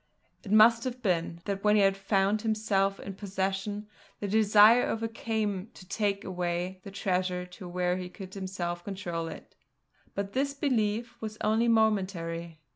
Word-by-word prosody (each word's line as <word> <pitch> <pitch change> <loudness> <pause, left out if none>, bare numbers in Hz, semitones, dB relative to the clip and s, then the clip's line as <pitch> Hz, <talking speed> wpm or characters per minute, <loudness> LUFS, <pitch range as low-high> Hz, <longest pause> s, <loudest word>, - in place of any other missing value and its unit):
It 200 - -7
must 230 +2 +7
have 255 -1 -4
been, 170 -3 0
that 200 0 -3
when 210 0 +5
he 195 -2 +5
found 195 +1 +1
himself 210 -3 +1
in 195 - -6
possession, 195 +1 -3 0.3
the 205 - -3
desire 215 +3 +6
overcame 225 -2 -1
him 195 +5 -10
to 185 - -13
take 200 0 -1
away 180 0 -3
the - - -8
treasure 185 -2 -1
to 180 0 -10
where 180 0 0
he 180 -1 -5
could 190 0 -10
himself 180 -3 -4
control 175 -4 -4
it. - - -10 0.6
But 200 0 -3
this 280 +1 0
belief 235 -3 -1
was 215 -1 -5
only 220 +2 +2
momentary. 185 -7 0
195 Hz, 155 wpm, -29 LUFS, 185-215 Hz, 0.6 s, must